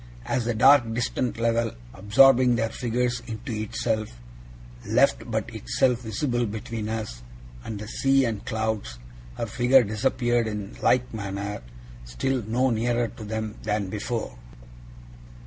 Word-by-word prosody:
As 120 - -1
the 120 -1 -1
dark 130 0 +6
distant 120 0 -1
level, 115 0 +1 0.2
absorbing 125 +2 +5
their 115 -1 0
figures 125 +1 -1
into 115 +3 -6
itself, 110 0 -2 0.7
left - - +2
but - - -2
itself 120 - +1
visible 120 +1 -1
between 110 +1 -5
us 110 - -4 0.4
and 110 - -5
the 105 +1 -7
sea 135 +3 +2
and 110 -3 -3
clouds, 110 - -3 0.4
her - - -2
figure 125 +3 +4
disappeared 120 +2 0
in 105 -1 -5
like 125 -1 +2
manner, 100 -1 -4 0.4
still - - -2
no 120 +4 +1
nearer 120 +1 0
to 110 - -10
them 110 0 -4
than 105 -2 -1
before. 110 - -3
115 Hz, 130 wpm, -25 LUFS, 105-125 Hz, 0.7 s, dark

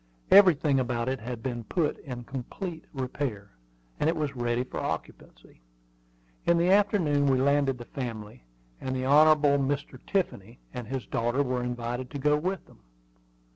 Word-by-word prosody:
Everything 160 -8 +6
about 120 -2 -1
it 130 0 -1
had 115 0 -6
been 120 -3 -3
put 155 +6 -1
in 125 -3 -7
complete 160 - -6
repair, 125 -6 -4 0.5
and 155 - +2
it 165 - 0
was 150 -3 -2
ready 120 0 0
for 130 - -6
occupancy. - - -7 0.8
In 170 - +3
the 175 +2 +3
afternoon 185 -8 +3
we 130 -1 +3
landed 140 -1 +2
the 120 - -9
family, 110 - -6 0.4
and 130 0 -3
the 130 0 -2
Hon. 155 +3 +7
Mr. 140 -2 0
Tiffany 120 - -2
and 125 -3 -6
his 130 -1 -4
daughter 120 +4 0
were 125 -2 -1
invited 120 +1 -4
to 145 - -6
go 150 +2 +3
with 185 +4 -2
them. - - -20
135 Hz, 160 wpm, -28 LUFS, 120-150 Hz, 0.8 s, Hon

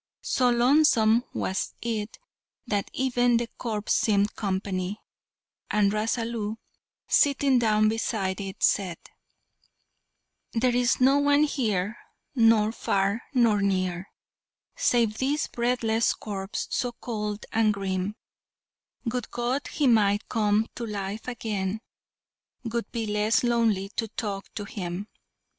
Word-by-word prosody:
So 250 -1 +2
lonesome 240 -2 +4
was 190 - -2
it 225 -2 -3 0.5
that 205 -2 -1
even 245 -2 +2
the 235 - 0
corpse 215 -3 -1
seemed 205 -1 +2
company, 190 0 -2 0.7
and 205 -1 +3
Rasalu, 225 0 -1 0.5
sitting 280 -2 +3
down 215 -2 +3
beside 215 -3 -1
it, 195 -1 -6
said: 185 -4 +2 1.6
"There 240 +1 +2
is 245 0 +2
no 270 +2 +5
one 285 +1 +4
here, 220 -7 -1 0.3
nor 225 -4 +4
far 200 0 0
nor 225 -5 +4
near, 185 -2 -1 0.7
Save 235 - +1
this 285 +3 +1
breathless 235 -2 +1
corpse 195 -2 -5
so 245 -1 -1
cold 210 -3 -4
and 220 -1 +3
grim; 195 0 -2 0.9
Would 245 0 -2
God 245 +4 -2
he 295 - -1
might 210 -4 +3
come 215 -1 +2
to 240 - -4
life 205 +1 -5
again, 215 -4 -3 0.9
'Twould 235 +1 -3
be 230 -2 -2
less 210 +2 +1
lonely 225 -5 +1
to 225 - 0
talk 205 -2 -5
to 210 - -4
him." 195 0 -5
220 Hz, 115 wpm, -26 LUFS, 200-240 Hz, 1.6 s, no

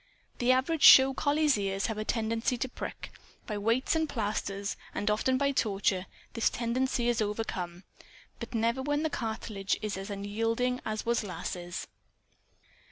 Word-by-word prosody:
The 245 +1 +3
average 270 +5 +1
show 265 0 +9
collie's 290 -3 +2
ears 195 0 -1
have 220 -2 -2
a - - -1
tendency 225 +2 -1
to 250 - -2
prick. 250 - -7 0.3
By 210 -3 -3
weights 230 +8 +1
and 320 -1 0
plasters, 205 -4 -2 0.2
and 205 - 0
often 255 +5 +1
by 280 +1 +2
torture, 195 -6 0 0.3
this 230 - +2
tendency 240 +1 -1
is 240 -2 +1
overcome. 190 -4 -3 0.6
But - - -6
never 230 +3 +1
when 290 +2 0
the 315 - 0
cartilage 220 -5 -2
is 210 -2 -3
as 195 +1 -6
unyielding 225 +5 -1
as 215 -1 -3
was 235 -1 +1
Lass's. 180 -2 -5
225 Hz, 155 wpm, -30 LUFS, 205-255 Hz, 0.6 s, show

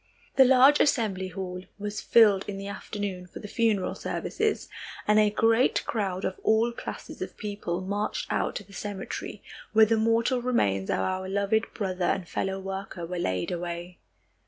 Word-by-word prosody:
The 265 - +8
large 265 +3 +6
assembly 210 -9 +2
hall 180 0 -5 0.2
was 210 0 -4
filled 210 -4 +5
in 200 - -4
the 195 - -6
afternoon 200 -2 -5
for - - -11
the - - -8
funeral 215 -4 +1
services, 435 -1 -2 0.4
and 210 0 +5
a 210 -1 +5
great 225 +4 +3
crowd 195 -4 -2
of 185 - -3
all 225 +2 +3
classes 235 - -8
of - - -5
people 200 -4 -3
marched 205 +3 -2
out - - 0
to - - -4
the 200 +1 -18
cemetery, 200 -1 -6 0.3
where 220 0 +7
the 225 +1 +2
mortal 230 +3 +2
remains 100 - +1
of - - +1
our 185 - -2
loved 200 +3 +1
brother 185 -3 -1
and 175 0 0
fellow 190 +2 -2
worker 195 -2 -5
were 180 +1 -4
laid 95 - -1
away. 175 0 -5
200 Hz, 170 wpm, -27 LUFS, 185-220 Hz, 0.4 s, The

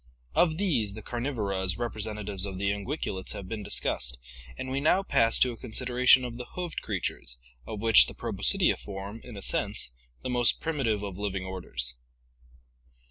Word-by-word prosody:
Of 160 - +3
these 125 - +1
the 110 - -8
Carnivora 120 -6 -2
as 90 -1 -1
representatives 105 -4 -1
of 95 -1 -5
the 100 +1 +1
unguiculates 100 -2 -3
have 95 - -7
been 110 +1 -4
discussed, 65 -9 -1 0.4
and 130 - -4
we 135 - 0
now 170 +7 +3
pass 115 -11 +3
to 125 - +5
a 115 - -8
consideration 125 +2 +4
of 120 -1 -6
the 125 - -5
hoofed 175 -2 -3
creatures, - - -3 0.3
of 105 -2 -5
which 115 -1 +8
the - - -8
Proboscidea - - +2
form, 100 +2 -7
in 120 -4 -9
a 100 - -5
sense, - - +1 0.3
the - - -2
most 120 -1 +3
primi 150 -5 -1
tive 105 -2 +1
of 100 -2 -5
living 95 -2 -2
orders. 65 -10 -1
110 Hz, 175 wpm, -29 LUFS, 100-125 Hz, 0.4 s, which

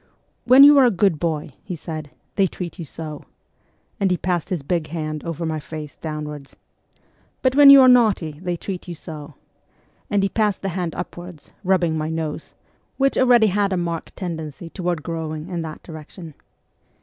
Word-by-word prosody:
' - - -45
When 265 +2 +10
you 290 0 +9
are 265 - +6
a - - +5
good 195 -6 +1
boy,' 155 -2 -2
he 180 - -5
said, 155 -2 -7
' - - -44
they 195 -2 +3
treat 180 0 -7
you 170 - -5
so,' 155 0 -8 0.8
and 195 -2 +2
he 180 - +1
passed 180 -1 -2
his 175 -7 -3
big 165 +1 -1
hand 155 -2 -4
over 170 0 -4
my 160 -1 -2
face 150 -1 -8
downwards; 150 -2 -7 0.4
' - - -39
but 260 -1 +3
when 285 -1 +9
you 275 -1 +10
are 260 - +7
naughty, 210 -12 +3
they 180 -1 -2
treat 185 +1 -6
you 175 - -6
so/ 155 -3 -9 0.7
and 200 -1 +1
he 195 - +1
passed 210 -1 0
the 195 - -1
hand 175 -2 -3
upwards, 175 -3 -8
rubbing 175 -4 +1
my 155 +1 -2
nose, 160 -2 -5 0.4
which 275 0 +2
already 245 -3 +5
had 200 -1 +1
a 185 - 0
marked 170 -2 -4
tendency 165 -3 -6
toward 175 -5 -3
growing 160 0 -5
in 175 -2 -3
that 155 -1 -7
direction. 160 0 -10
170 Hz, 190 wpm, -22 LUFS, 155-195 Hz, 0.8 s, When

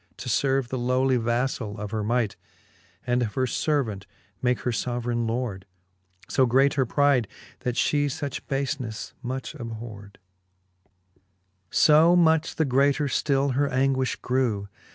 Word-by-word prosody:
To - - -6
ferve 135 -2 +1
the 130 - -3
lowly 130 +1 +2
vaflall 120 -2 -1
of 105 -1 -6
her 110 -1 -2
might, 115 -1 0 0.7
And 125 0 +1
of 110 -4 -2
her 130 - +1
fervant 120 -8 -1 0.3
make 125 -1 +1
her 125 - -1
foverayne 120 0 -2
lord: 110 -5 -3 0.6
So 130 -2 +2
great 135 +4 +4
her 135 -4 +1
pride, 140 -4 +3 0.3
that 125 -1 -2
fhe 145 +2 +2
fuch 140 0 -4
bafeneffe 135 -5 -3
much 130 +1 -5
abhord. 110 -6 -8
XXVIII. 95 0 -43 0.5
So 160 - +5
much 160 -2 +3
the 160 - +1
greater 140 +3 +2
ftill 140 -1 +1
her 140 +2 +1
anguifh 130 0 0
grew. 115 -6 0
125 Hz, 140 wpm, -25 LUFS, 110-135 Hz, 0.7 s, So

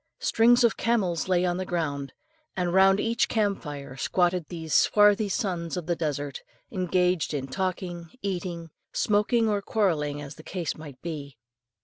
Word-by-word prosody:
Strings 240 +2 +4
of 235 - +3
camels 190 -9 0
lay 180 -1 +2
on 175 0 0
the 185 - -2
ground; 145 -6 -2 0.5
and 175 -1 0
round 195 +1 +5
each 230 +2 +1
camp 205 -3 +1
fire 140 -3 -7
squatted 175 +3 +1
these 160 -3 -5
swarthy 210 0 +5
sons 180 -5 -2
of 175 - -4
the 175 0 0
desert, 145 -4 -3 0.3
engaged 180 -3 +1
in 135 -2 -3
talking, 175 +1 -3
eating, 175 -4 -4 0.2
smoking, 220 +2 +2
or 205 -2 +1
quarrelling, 160 -9 0
as 145 0 -7
the - - -10
case 175 -3 -3
might 145 -5 -11
be. 145 -6 -6
175 Hz, 155 wpm, -27 LUFS, 155-200 Hz, 0.5 s, round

